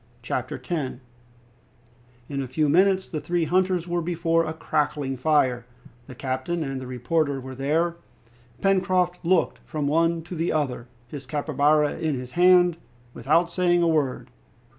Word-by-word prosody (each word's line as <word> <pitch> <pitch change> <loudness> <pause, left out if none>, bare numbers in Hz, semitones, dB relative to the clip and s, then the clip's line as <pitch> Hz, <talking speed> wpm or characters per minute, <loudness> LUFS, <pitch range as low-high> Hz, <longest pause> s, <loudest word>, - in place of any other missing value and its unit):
Chapter 125 +1 -3
10 145 -8 -4 1.3
In 140 -1 -3
a 135 - -4
few 150 +5 0
minutes 190 +4 +3
the 155 -3 -4
three 170 +3 0
hunters 180 +1 +1
were 175 0 -1
before 165 -1 +1
a 155 - -3
crackling 150 -3 -1
fire. 130 -4 +1 0.4
The 130 - -10
captain 130 +7 -2
and 135 -2 -4
the 130 - -7
reporter 140 +3 -1
were 130 0 -8
there. 160 +6 0 0.6
Pencroft 185 -2 +1
looked 175 0 +1
from 155 -3 -4
one 165 +2 +1
to 175 - -9
the 165 0 -1
other, 130 -6 -2 0.2
his 135 0 -9
capybara 150 +1 +1
in 155 -3 -1
his 125 -1 -7
hand, 180 -1 +5 0.4
without 160 +8 +1
saying 175 -1 +2
a - - +3
word. 150 -5 0
155 Hz, 150 wpm, -25 LUFS, 135-175 Hz, 1.3 s, hand